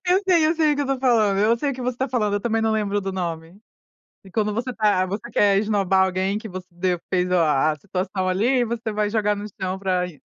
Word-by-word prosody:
eu 370 +3 +3
sei, 335 -4 +5
eu 320 - +2
sei 310 -2 +2
o - - +1
que 290 - 0
eu - - -2
estou 270 -1 -2
falando, 220 -6 +3
eu 225 +3 +3
sei 285 +3 -1
o - - -4
que 255 - -7
você 250 0 -1
está 265 +2 -2
falando, 215 -5 0
eu 205 - 0
também 225 0 0
não 220 - +1
lembro 205 -2 0
do 195 0 -4
nome. 170 0 -5 0.6
E 190 - -14
quando 210 0 -1
você 245 +3 -3
tá 210 -5 +2
você 200 +5 -5
quer 200 -2 +4
esnobar 195 -3 +2
alguém 190 +2 -1
que 220 0 -8
você 185 0 -8
de 180 +1 -1 0.2
fez 180 0 +1
o 180 - +2
a 155 -3 +3
a 150 - -6
situação 185 +2 -3
ali, 240 +7 +2
você 230 -1 -3
vai 210 0 0
jogar 210 -1 +1
no 205 +1 -6
chão 185 0 -2
pra 185 -2 0
isso 165 -5 -13
205 Hz, 265 wpm, -23 LUFS, 185-235 Hz, 0.6 s, sei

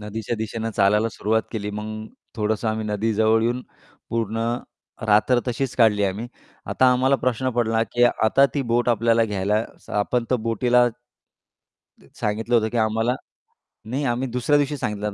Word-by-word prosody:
नदीच्या 110 +2 -4
दिशेनं 110 +1 -4
चालायला 105 +3 +3
सुरुवात 110 +1 0
केली 105 -2 -3
मग 110 +1 -6 0.3
थोडंसं 110 0 -1
आम्ही 110 0 -2
नदीजवळ 110 +1 +2
येऊन 120 +2 0 0.5
पूर्ण 115 0 -1 0.6
रात्र 110 +4 +4
तशीच 125 +1 -2
काढली 110 -4 +4
आम्ही. 100 +4 -2 0.4
आता 130 - +2
आम्हाला 130 +2 +3
प्रश्न 130 0 -1
पडला 115 -2 +1
की 120 - +1
आता 120 +3 +3
ती 140 - 0
बोट 120 +1 +2
आपल्याला 115 0 +3
घ्यायला 105 +1 0 0.2
स - - -15
आपण 115 +4 0
तर 130 - +3
बोटीला 120 +2 +3 1.1
त - - -21
सांगितलं 110 +3 -2
होतं, 110 -1 +3
की 120 - -5
आम्हाला 115 +2 +1 0.8
नाही, 135 +3 -1
आम्ही 125 +1 -1
दुसऱ्या 125 +4 +2
दिवशी 145 0 0
सांगितलं 105 -5 -3
115 Hz, 155 wpm, -23 LUFS, 105-120 Hz, 1.1 s, रात्र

